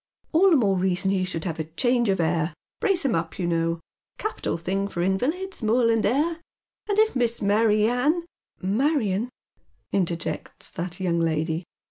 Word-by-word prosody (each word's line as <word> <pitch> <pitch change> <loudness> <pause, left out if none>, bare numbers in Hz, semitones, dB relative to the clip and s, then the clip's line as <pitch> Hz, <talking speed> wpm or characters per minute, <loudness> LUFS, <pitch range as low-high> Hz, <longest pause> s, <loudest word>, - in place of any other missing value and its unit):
"All 365 +4 +5
the 340 - +5
more 205 -8 +3
reason 185 +1 +1
he 190 -1 +1
should 165 -3 -4
have 160 -2 -4
change 240 -1 +2
of 190 - +1
air 165 -1 0
— - - -69
brace 390 -8 +1
him 265 - +2
up, 165 0 -2
you 185 - -1
know. 165 0 0 0.4
Capital 430 - -2
thing 195 +4 -1
for 175 -3 -2
invalids, 300 - -1
moorland 230 0 +3
air. 315 +8 +1 0.5
And 410 - +1
if 435 -5 +4
Miss 235 -2 +1
Mary 210 +1 +3
Ann 290 +9 +1
" - - -68
" - - -34 0.2
Marion," 245 -7 +1 0.6
interjects 170 -4 -2
that 180 +2 -5
young 175 -3 +1
lady. 160 +1 0
200 Hz, 170 wpm, -25 LUFS, 170-255 Hz, 0.6 s, All